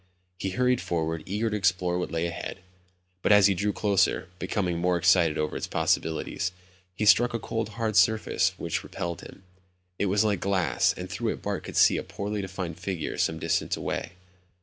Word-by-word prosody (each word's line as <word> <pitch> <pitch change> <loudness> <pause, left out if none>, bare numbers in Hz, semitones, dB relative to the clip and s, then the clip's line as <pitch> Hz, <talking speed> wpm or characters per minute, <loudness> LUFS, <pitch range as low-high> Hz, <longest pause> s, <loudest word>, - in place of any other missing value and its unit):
He 95 - -2
hurried 125 +5 +1
forward, 80 -1 -2
eager 110 +4 -1
to - - -1
explore 90 -3 +1
what 90 - -3
lay 85 0 -1
ahead. 85 0 -5 0.6
But - - +2
as 105 -2 +7
he 100 - +5
drew 105 +3 0
closer, 100 -3 +1
becoming 95 -2 -1
more 90 0 +2
excited 85 -2 +4
over 75 - -1
its - - -3
possibilities, 80 +3 0 0.4
he 105 - -1
struck 120 +3 +5
a - - -1
cold 110 0 -3
hard 110 -3 -1
surface 95 -1 +3
which 85 - -2
repelled 85 -1 -5
him. 95 - -13 0.6
It 100 - +1
was 100 +3 +3
like 105 -4 +1
glass 95 -3 +2
and 90 - -5
through 110 +5 -2
it - - -11
Bart 100 -2 -3
could - - -6
see - - +6
a - - -3
poorly 105 +1 -4
defined 95 -3 -5
figure 90 -3 -3
some 80 - +1
distance 80 0 0
away. - - -4
95 Hz, 190 wpm, -27 LUFS, 85-105 Hz, 0.6 s, as